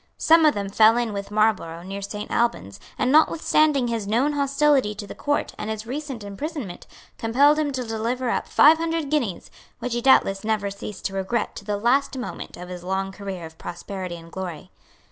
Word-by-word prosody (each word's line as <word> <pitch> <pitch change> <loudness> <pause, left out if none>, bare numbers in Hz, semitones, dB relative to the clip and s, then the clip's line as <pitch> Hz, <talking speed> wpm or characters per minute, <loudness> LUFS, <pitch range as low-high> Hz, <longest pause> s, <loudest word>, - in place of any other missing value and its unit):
Some 325 0 +5
of 295 - +3
them 200 -1 -2
fell 220 +3 +5
in 235 -3 -1
with 200 0 -5
Marlborough 210 -6 0
near 195 +2 -6
Saint 210 +1 -6
Albans, 100 - -1 0.2
and, 255 - +1
notwithstanding 305 -3 +3
his 230 -3 -2
known 250 +8 +2
hostility 280 -5 +2
to 205 - -6
the - - -8
Court 290 0 -1
and 210 - -4
his 220 0 -4
recent 265 -2 -5
imprisonment, 210 - -6 0.3
compelled 280 +7 +4
him 295 -2 0
to 260 -2 -3
deliver 235 +3 -2
up - - -1
five 315 +2 +6
hundred 330 -3 -2
guineas, 245 - -1 0.3
which 245 - -4
he 240 - -1
doubtless 195 -6 +4
never 215 -2 -1
ceased 200 0 -8
to 195 - -2
regret 195 +4 -2
to - - -9
the 210 -1 -1
last 265 +5 +1
moment 250 - -6
of 180 +1 -8
his 180 -1 -8
long 190 +1 -2
career 195 -3 -6
of 160 0 -13
prosperity 180 +1 -6
and 165 0 -13
glory. 180 -5 -6
220 Hz, 195 wpm, -24 LUFS, 195-275 Hz, 0.3 s, five